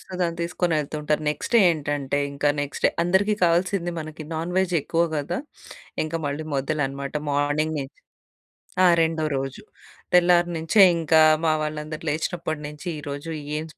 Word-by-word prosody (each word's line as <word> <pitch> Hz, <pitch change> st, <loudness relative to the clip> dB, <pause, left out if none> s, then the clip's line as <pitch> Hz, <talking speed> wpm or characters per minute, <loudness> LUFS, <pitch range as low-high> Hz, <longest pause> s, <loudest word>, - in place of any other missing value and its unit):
So, -, -, -19 dB
దాన్ని 170 Hz, -1 st, -1 dB
తీసుకొనేళ్తూ 165 Hz, -4 st, -1 dB
ఉంటారు. 150 Hz, +1 st, 0 dB
Next 150 Hz, -, -4 dB
ఏంటంటే 145 Hz, -4 st, 0 dB
ఇంక 140 Hz, +1 st, -6 dB, 0.2 s
నెక్స్ట్ 145 Hz, -, -6 dB
డే -, -, +2 dB
అందరికి 190 Hz, +4 st, +2 dB
కావాల్సింది 175 Hz, +1 st, +1 dB
మనకి 155 Hz, 0 st, -8 dB
నాన్ 165 Hz, +3 st, -3 dB
వెజ్ 185 Hz, -2 st, +1 dB
ఎక్కువ 165 Hz, +3 st, +1 dB
గదా! 150 Hz, +4 st, -2 dB, 0.7 s
ఇంక 155 Hz, -, -6 dB
మళ్ళీ 145 Hz, +2 st, -4 dB
మొదలనమాట. 140 Hz, -1 st, -2 dB, 0.2 s
మార్నింగ్ 145 Hz, +2 st, 0 dB
నించి. 135 Hz, -1 st, -8 dB, 0.9 s
ఆ! -, -, +7 dB, 0.2 s
రెండో 160 Hz, -1 st, 0 dB
రోజు. 135 Hz, 0 st, -4 dB, 0.5 s
తెల్లారి 175 Hz, 0 st, +5 dB
నించే 165 Hz, +6 st, +4 dB, 0.2 s
ఇంకా 160 Hz, 0 st, +4 dB, 0.2 s
మా 160 Hz, -, +3 dB
వాళ్ళందరూ 155 Hz, 0 st, -5 dB
లేచినప్పటి 160 Hz, +1 st, -2 dB
నించి 150 Hz, +4 st, -8 dB
ఈ -, -, -6 dB
రోజు 145 Hz, +3 st, -5 dB, 0.3 s
ఏం 155 Hz, -, -3 dB
155 Hz, 150 wpm, -24 LUFS, 145-170 Hz, 0.9 s, ఆ